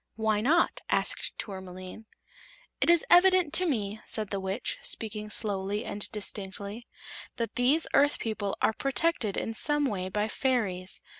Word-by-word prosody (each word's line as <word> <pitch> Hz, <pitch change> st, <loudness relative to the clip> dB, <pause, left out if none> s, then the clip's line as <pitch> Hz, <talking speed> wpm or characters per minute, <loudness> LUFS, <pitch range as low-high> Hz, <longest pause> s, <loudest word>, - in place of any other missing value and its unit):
"Why 220 Hz, -1 st, +1 dB
not?" 315 Hz, +9 st, +2 dB
asked -, -, 0 dB
Tourmaline. 190 Hz, +1 st, -8 dB, 0.7 s
"It -, -, +3 dB
is 340 Hz, -1 st, +5 dB
evident 360 Hz, -3 st, +6 dB
to 365 Hz, +2 st, +5 dB
me," 215 Hz, -7 st, -2 dB
said 215 Hz, -3 st, -2 dB
the 200 Hz, -, -1 dB
Witch, 190 Hz, +5 st, -3 dB
speaking 215 Hz, -1 st, -5 dB
slowly 205 Hz, 0 st, -2 dB
and 205 Hz, 0 st, -3 dB
distinctly, 205 Hz, +1 st, -5 dB, 0.5 s
"that 230 Hz, -1 st, -3 dB
these 270 Hz, +6 st, +3 dB
Earth 290 Hz, +1 st, +4 dB
people 215 Hz, -3 st, -3 dB
are -, -, +4 dB
protected 275 Hz, -5 st, 0 dB
in 225 Hz, -, -2 dB
some 295 Hz, +5 st, +2 dB
way 185 Hz, -7 st, -2 dB
by 210 Hz, +2 st, -1 dB
fairies. 205 Hz, -8 st, -1 dB
220 Hz, 145 wpm, -28 LUFS, 200-275 Hz, 0.7 s, evident